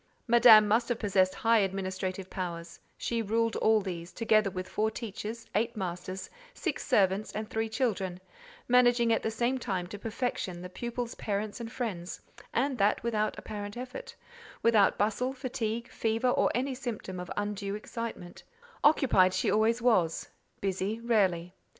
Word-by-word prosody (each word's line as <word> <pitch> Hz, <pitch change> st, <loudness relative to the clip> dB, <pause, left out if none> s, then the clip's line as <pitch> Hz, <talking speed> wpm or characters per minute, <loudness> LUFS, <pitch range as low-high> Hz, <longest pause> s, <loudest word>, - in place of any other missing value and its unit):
Madame 230 Hz, -3 st, +8 dB
must 230 Hz, +4 st, +2 dB
have 240 Hz, -, 0 dB
possessed 190 Hz, -4 st, +2 dB
high 230 Hz, 0 st, +3 dB
administrative 190 Hz, -1 st, -2 dB
powers: 170 Hz, -2 st, -6 dB, 0.2 s
she 235 Hz, -1 st, -1 dB
ruled 225 Hz, +1 st, 0 dB
all 220 Hz, -1 st, +4 dB
these, 175 Hz, -3 st, -6 dB
together 215 Hz, -3 st, +2 dB
with 185 Hz, 0 st, -5 dB
four 215 Hz, +1 st, 0 dB
teachers, 225 Hz, 0 st, -6 dB
eight 230 Hz, +2 st, 0 dB
masters, 185 Hz, 0 st, -4 dB, 0.3 s
six -, -, -3 dB
servants, 195 Hz, +1 st, +2 dB
and 215 Hz, +1 st, -4 dB
three 220 Hz, 0 st, -1 dB
children, 195 Hz, -7 st, -1 dB, 0.5 s
managing 245 Hz, -1 st, +4 dB
at -, -, +1 dB
the -, -, -1 dB
same 240 Hz, +4 st, 0 dB
time 190 Hz, -7 st, -2 dB
to 200 Hz, +3 st, -8 dB
perfection 220 Hz, -5 st, -3 dB
the 180 Hz, +1 st, -7 dB
pupils' 240 Hz, +3 st, -4 dB
parents 205 Hz, +1 st, -3 dB
and 230 Hz, 0 st, -6 dB
friends; 190 Hz, -9 st, -4 dB, 0.3 s
and 260 Hz, 0 st, 0 dB
that 200 Hz, +1 st, +2 dB
without 215 Hz, -2 st, 0 dB
apparent 205 Hz, 0 st, -6 dB
effort; 250 Hz, +1 st, -7 dB, 0.5 s
without 220 Hz, -4 st, +4 dB
bustle, 220 Hz, +5 st, 0 dB
fatigue, 235 Hz, -3 st, -3 dB
fever, 225 Hz, +2 st, 0 dB
or -, -, +3 dB
any 260 Hz, +2 st, 0 dB
symptom 235 Hz, -8 st, -5 dB
of 180 Hz, -, -7 dB
undue, 205 Hz, -1 st, -2 dB
excitement: 215 Hz, -4 st, -6 dB, 0.4 s
occupied 245 Hz, -11 st, +5 dB
she -, -, +1 dB
always 225 Hz, +2 st, +2 dB
was—busy, 195 Hz, 0 st, -1 dB
rarely. 185 Hz, -7 st, +1 dB
215 Hz, 150 wpm, -30 LUFS, 190-235 Hz, 0.5 s, Madame